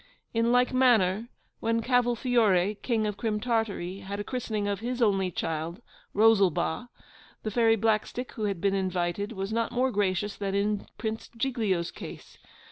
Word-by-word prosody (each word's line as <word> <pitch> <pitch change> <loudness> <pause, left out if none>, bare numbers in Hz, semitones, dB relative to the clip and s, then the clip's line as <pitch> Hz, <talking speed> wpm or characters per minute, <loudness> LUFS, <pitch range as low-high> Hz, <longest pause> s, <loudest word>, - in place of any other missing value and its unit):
In 230 +1 +2
like 250 +1 +3
manner, 230 -4 +3 0.3
when 230 0 0
CAVOLFIORE, 235 -6 +3
King 225 -4 0
of 210 -1 -2
Crim 215 0 -1
Tartary, 210 -5 -1
had 200 +1 -6
a - - -2
christening 220 -4 -2
of 200 -2 -1
his 245 +3 -3
only 195 -5 +2
child, 165 +1 -3 0.4
ROSALBA, 210 0 +3 0.5
the 215 - -2
Fairy 225 0 +4
Blackstick, 225 +3 0
who 215 - -3
had 200 -4 -1
been 195 +2 +1
invited, 185 +1 -1
was 195 +1 -4
not 230 0 0
more 255 +2 +1
gracious 200 -1 0
than 195 -1 -2
in 205 0 0
Prince 220 0 -4
Giglio's 220 -9 0
case. - - -10
210 Hz, 155 wpm, -28 LUFS, 195-235 Hz, 0.5 s, Fairy